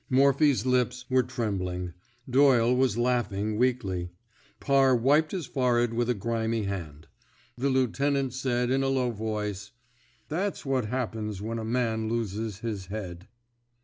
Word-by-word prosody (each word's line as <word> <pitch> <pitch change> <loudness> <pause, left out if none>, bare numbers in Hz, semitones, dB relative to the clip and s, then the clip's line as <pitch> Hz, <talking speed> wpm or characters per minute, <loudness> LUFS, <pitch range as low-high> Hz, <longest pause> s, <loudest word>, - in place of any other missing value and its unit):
Morphy's 140 +1 +4
lips 125 0 +1
were 130 0 +5
trem 115 -5 -2
bling. 90 -1 -4 0.3
Doyle 125 -2 +4
was 125 -3 +2
laughing 110 -4 0
weakly. 105 -8 0 0.5
Parr 135 -2 +4
wiped 145 +6 +3
his 180 -5 -3
forehead 120 -3 +1
with 120 +1 0
a 125 - +2
grimy 115 +1 -1
hand. 85 -7 -5 0.5
The 135 +3 0
lieutenant 135 +1 +1
said, 125 -1 0
in 135 +1 +2
a 135 - +1
low 130 -2 +1
voice: 105 -2 -4 0.5
That's 190 +4 -2
what 130 -4 0
happens 110 -4 -3
when 115 +3 -4
a - - -4
man 110 -1 -1
loses 110 -2 -3
his 105 -5 -4
head.' 95 -3 -6
120 Hz, 145 wpm, -27 LUFS, 105-130 Hz, 0.5 s, were